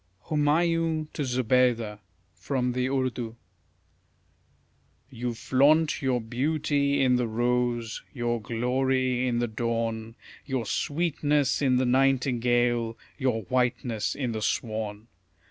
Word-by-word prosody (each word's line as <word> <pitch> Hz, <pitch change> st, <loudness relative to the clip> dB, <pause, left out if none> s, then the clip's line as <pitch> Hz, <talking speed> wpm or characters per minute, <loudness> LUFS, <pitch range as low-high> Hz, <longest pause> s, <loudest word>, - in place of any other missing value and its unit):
HUMAYUN 160 Hz, +1 st, +1 dB
TO -, -, -4 dB
ZOBEIDA 125 Hz, -4 st, +1 dB, 0.3 s
(From 125 Hz, -, -1 dB
the 125 Hz, +1 st, 0 dB
Urdu) 130 Hz, -4 st, -2 dB, 1.8 s
You 120 Hz, -1 st, -4 dB
flaunt 150 Hz, +7 st, +3 dB
your 130 Hz, -3 st, +1 dB
beauty 140 Hz, +4 st, 0 dB
in 125 Hz, -1 st, +4 dB
the 125 Hz, -1 st, 0 dB
rose, 120 Hz, 0 st, -1 dB
your 120 Hz, -3 st, -2 dB
glory 130 Hz, +2 st, 0 dB
in 120 Hz, -1 st, 0 dB
the 120 Hz, 0 st, 0 dB
dawn, 115 Hz, 0 st, -2 dB, 0.3 s
Your 130 Hz, -4 st, -2 dB
sweetness 145 Hz, +1 st, 0 dB
in 130 Hz, -3 st, +3 dB
the 130 Hz, +1 st, +2 dB
nightingale, 125 Hz, -3 st, +2 dB, 0.2 s
your 125 Hz, -4 st, 0 dB
whiteness 120 Hz, -2 st, -1 dB
in 130 Hz, -4 st, -2 dB
the 110 Hz, -1 st, -4 dB
swan. 110 Hz, -1 st, -2 dB
125 Hz, 110 wpm, -27 LUFS, 115-135 Hz, 1.8 s, in